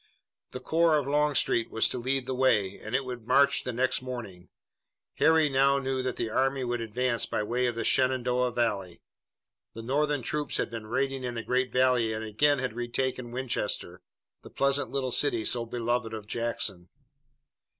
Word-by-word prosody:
The 125 - -7
corps 160 +4 +3
of 145 - -1
Longstreet 145 -5 +1
was 110 - +2
to 125 - -4
lead 130 +2 -1
the 130 - -3
way, 105 -7 +2
and 110 +3 -4
it 135 0 0
would 125 -3 -7
march 140 +2 +4
the 125 - -3
next 130 +2 0
morning. 115 -9 -7 0.7
Harry 160 -1 +4
now 140 0 +3
knew 135 -1 -1
that 130 -1 -2
the 115 -2 -3
army 135 +2 +1
would 120 -1 -2
advance 120 +2 0
by - - -1
way 125 +3 0
of 120 - -2
the 115 - -2
Shenandoah 125 -1 +2
valley. 100 -7 -2 0.7
The 115 - -7
Northern 145 +2 0
troops 150 +4 -2
had - - -2
been 115 -2 -6
raiding 135 +3 -1
in 120 -1 -3
the 115 - -4
great 130 +2 0
valley 125 -3 +2
and 110 0 -4
again 145 +7 +2
had 125 -3 -3
retaken 120 +1 -3
Winchester, 120 -7 -3 0.4
the - - -12
pleasant 140 +1 0
little 135 -2 -2
city 120 -4 +1
so 120 -1 0
beloved 120 -1 -2
of 110 -2 -8
Jackson. 105 -5 -2
125 Hz, 180 wpm, -28 LUFS, 115-135 Hz, 0.7 s, march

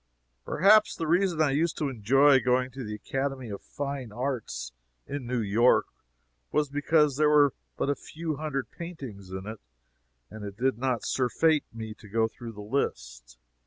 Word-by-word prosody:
Perhaps 210 +5 +5
the 165 - -3
reason 175 +1 +2
I 145 - +2
used 160 +4 0
to 150 - 0
enjoy 135 +3 +4
going 125 0 +1
to 130 +1 -7
the 105 -1 -5
Academy 135 +1 -3
of 100 - -6
Fine 140 -5 -5
Arts 115 - -3 0.3
in 140 -4 -5
New 125 -1 0
York 110 +4 +4 0.7
was 150 -2 +1
because 145 0 +2
there 150 0 +4
were 145 -3 +5 0.2
but - - 0
a 145 - +3
few 155 +2 -5
hundred 140 -4 -3
paintings 135 - -8
in 95 +1 -6
it, 110 0 -7 0.7
and 110 -1 -8
it 100 -1 -7
did 130 -1 0
not 125 -2 -1
surfeit 150 +5 +2
me 110 -1 -6
to 105 -1 -16
go 110 +2 +2
through 115 +1 -9
the 105 - -9
list. - - -3
130 Hz, 170 wpm, -28 LUFS, 110-145 Hz, 0.7 s, Perhaps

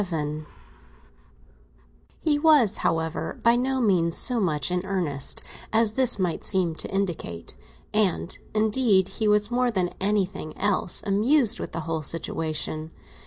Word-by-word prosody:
VII 155 -4 -4 1.8
HE 295 -2 +1
was, 290 - +4
however, 160 -1 -2
by 235 0 +5
no 260 +2 0
means 180 -8 +2
so 250 -3 +4
much 155 -6 0
in 180 0 -1
earnest 175 -8 -2 0.3
as 220 -1 +2
this 255 -1 +3
might 180 -4 -2
seem 185 -4 +1
to - - -5
indicate; 175 - -4 0.4
and, 200 -4 0 0.2
indeed, 215 -3 +2
he 220 - +1
was 210 +1 +2
more 250 0 +1
than 185 -6 -1
anything 195 -5 -2
else 195 -3 0
amused 220 +5 +3
with - - -6
the 165 - -4
whole 160 0 -3
situation. 155 0 -1
195 Hz, 135 wpm, -25 LUFS, 165-220 Hz, 1.8 s, by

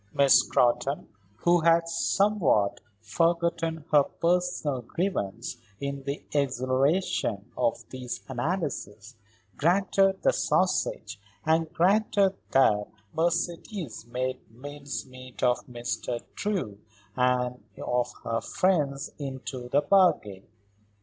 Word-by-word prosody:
Miss 140 -1 +6
Scrotton, 125 +3 +1 0.3
who 175 +10 +3
had 165 0 +4
somewhat 165 - +2 0.2
forgotten 165 - 0
her 150 -1 +7
personal 170 -4 0
grievance 120 - -3 0.2
in 140 0 -4
the 140 +1 -4
exhilaration 130 - 0
of 115 - -1
these 125 -2 -6
analyses, 125 - -3 0.4
granted 190 +3 +2
the - - +4
sausage 110 - 0 0.3
and 160 0 +2
granted 195 +2 +3 0.2
that 105 -6 +3 0.3
Mercedes 170 - -2
made 130 +1 -2
mincemeat 130 0 -8
of 125 -1 +2
Mr. 120 -1 -3
Drew 180 - -3 0.4
and 125 0 +1
of 125 0 -1
her 115 0 -1
friends 150 -6 0
into 130 -3 -6
the 145 +3 +3
bargain. 150 - +2
140 Hz, 95 wpm, -27 LUFS, 125-170 Hz, 0.4 s, her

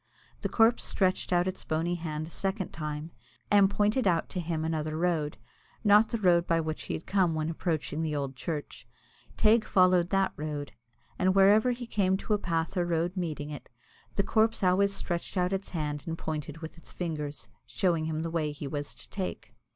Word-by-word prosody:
The - - -2
corpse 225 +1 +4
stretched 185 -2 0
out 175 0 +3
its 185 - -3
bony 165 +2 -1
hand 155 -3 -3
a 165 - -11
second 195 +1 -2
time, 150 0 -5 0.4
and 200 -1 +6
pointed 210 +4 +2
out 170 -3 +2
to 185 - -3
him 165 -2 -2
another 155 -1 -2
road 160 -3 0 0.5
not 210 +1 +6
the 230 - -1
road 175 -4 +3
by 165 0 +3
which 155 -1 -3
he - - -2
had 160 - -7
come 185 -4 +2
when 155 +1 -1
approaching 160 -2 -2
the 155 -2 -1
old 140 -2 -3
church. 150 +1 -5 0.5
Teig 220 +1 +5
followed 185 -3 +4
that 195 -1 +2
road, 150 -1 -4 0.5
and 185 +1 +3
whenever 205 +5 +6
he 245 0 -2
came 190 -4 +1
to 210 - -2
a 210 - +2
path 165 0 -1
or 175 - +2
road 170 +2 0
meeting 155 -5 -3
it, 145 - -8 0.5
the 200 - +2
corpse 220 +1 +2
always 190 +2 +4
stretched 175 -2 -3
out 180 +1 +1
its 195 +1 -3
hand 150 -4 -3
and 165 0 -3
pointed 155 0 -5
with 160 +1 -8
its - - -11
fingers, 150 -4 -4 0.2
showing 170 -4 +1
him 160 0 -2
the 165 - -3
way 155 -3 0
he 145 -1 -6
was 145 +1 -4
to - - -10
take. 190 -2 -5
170 Hz, 195 wpm, -29 LUFS, 155-195 Hz, 0.5 s, and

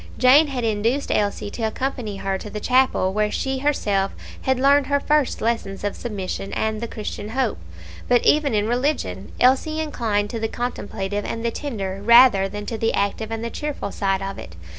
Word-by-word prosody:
Jane 270 +5 +6
had 260 -4 -3
induced 225 +5 0
Elsie 205 0 0
to 235 - -7
accompany 220 -2 -2
her 195 0 -2
to 210 - -8
the 210 - -5
chapel, 250 -6 +2
where 210 +1 +1
she 265 +4 -2
herself 205 -9 0 0.3
had 260 -1 +1
learned 280 +1 +4
her 285 0 +2
first 295 -1 +1
lesson 225 -4 -1
of 205 - -2
submission 195 -3 -5
and 220 +1 -1
of 235 - -4
Christian 210 -1 -6
hope; 260 +3 -1 0.5
but 245 -1 +3
even 295 -5 +3
in 210 0 +1
religion 240 - -1
Elsie 270 +5 +3
inclined 225 -9 -1
to 230 - -3
the 225 - -1
contemplative 205 -4 -4
and 230 +3 -4
the 235 - +1
tender 200 -9 -4
rather 235 -4 +6
than 205 +1 -6
to 225 +1 -4
the 225 +1 +1
active 200 +2 -1
and 225 0 -4
the 235 - -4
cheerful 295 -9 -4
side 195 -1 -1
of 195 0 -5
it. 85 - -10
225 Hz, 190 wpm, -22 LUFS, 205-260 Hz, 0.5 s, Jane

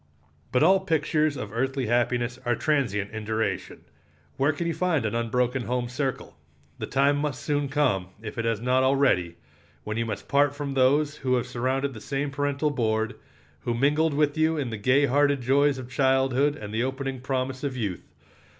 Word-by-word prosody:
But 130 +2 +3
all 190 +4 +6
pictures 155 -4 0
of 110 -4 -6
earthly 135 +2 -1
happiness 120 +1 0
are 120 -1 +1
transient 115 -8 0
in 110 0 -6
duration. 110 +1 -2 0.5
Where 135 +3 +2
can 165 +3 -4
you 170 - 0
find 165 -10 0
an 110 - -1
unbroken 125 +2 0
home 125 0 -1
circle? 130 +1 -3 0.4
The - - -4
time 140 +2 +2
must 145 -3 -3
soon 145 -2 0
come, 130 -11 +1
if 110 +1 -7
it 115 - -1
has 115 -2 0
not 125 +2 +2
already, 130 -11 +2 0.5
when 110 +1 -4
you 115 0 -1
must 105 -3 -5
part 145 0 +3
from 145 -1 -4
those 140 +3 +2
who 130 -1 0
have 120 -1 0
surrounded 130 +2 -1
the 110 - -10
same 140 +3 -2
parental 145 +1 0
board, 110 -4 0 0.5
who 120 +8 -2
mingled 145 +4 +2
with 145 -1 +2
you 160 0 +2
in 135 -5 -2
the 110 - -4
gay 130 +7 +3
hearted 145 +1 +2
joys 140 +3 +3
of 130 -2 -7
childhood 135 +2 +2
and 105 -6 -8
the 110 - 0
opening 135 0 -3
promise 130 0 -2
of 135 -3 -3
youth. 100 -7 -3
130 Hz, 185 wpm, -26 LUFS, 120-145 Hz, 0.5 s, all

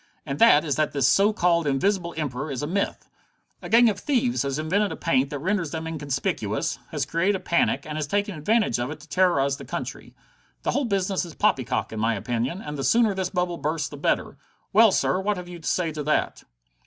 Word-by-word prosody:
"And 140 -2 -4
that 165 -10 +6
is 145 -4 -1
that 155 -1 0
this 140 -3 +2
so 200 +10 +4
called 170 -6 +1
Invisible 170 +5 0
Emperor 140 -1 -3
is 135 -1 -4
a - - 0
myth. 195 +6 -2 0.5
"A - - -8
gang 235 +1 +6
of 205 -3 0
thieves 250 -4 0
has 140 0 -2
invented 185 +7 0
a - - -4
paint 135 -4 +1
that 145 - -4
renders 180 +2 -1
them 160 +1 -5
inconspicuous, 140 -9 -2
has 145 -3 -2
created 170 +7 +1
a - - -3
panic, 170 -2 +1
and 155 0 -4
is 150 - -2
taking 205 +4 -1
advantage 175 - +1
of 120 +2 -2
it 155 - -7
to 155 - -15
terrorize 145 -5 +2
the 140 - -9
country. 135 - -6 0.5
The - - 0
whole 280 - 0
business 195 -3 0
is 170 -3 -9
poppycock, 135 - 0
in 110 - -4
my 115 +1 +1
opinion, 120 - -3
and 150 -1 -6
the - - -2
sooner 225 - +3
this 190 -1 -2
bubble 180 -2 -1
bursts 155 +1 -2
the - - -9
better. - - -1 0.4
Well, 220 +1 +7
sir, 185 - +1
what 205 +1 -1
have 180 -1 -7
you 175 -1 -9
to 160 - -3
say 170 -3 0
to 155 -1 -5
that?" 150 +1 -1
165 Hz, 225 wpm, -25 LUFS, 140-195 Hz, 0.5 s, Well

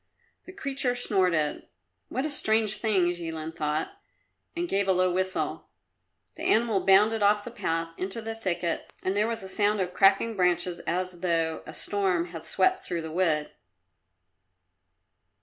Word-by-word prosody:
The - - -10
creature 270 -7 -1
snorted. 180 -10 +1 0.4
"What 260 +4 -2
a 310 - -3
strange 220 -6 +1
thing!" 190 -6 +2
Jilin 165 -2 -6
thought, 155 - -2 0.6
and 345 +1 -2
gave 200 - 0
a 190 - +4
low 185 0 +2
whistle. 185 +1 -2 0.7
The - - -9
animal 220 -3 +2
bounded 210 +3 +5
off 205 0 +3
the 240 - -7
path 165 -7 -2
into 190 +4 -2
the 225 0 -5
thicket 175 -6 -3
and 190 +1 0
there 210 +2 +2
was 230 -3 -3
a - - -7
sound 205 +2 +2
of 180 -1 -2
cracking 195 +3 +4
branches 180 -1 +1
as 180 0 -2
though 165 -2 0
a - - -8
storm 185 -4 0
had 165 -2 -8
swept 375 - +1
through 170 -2 -3
the 160 - -6
wood. 160 -3 0
190 Hz, 155 wpm, -27 LUFS, 170-220 Hz, 0.7 s, bounded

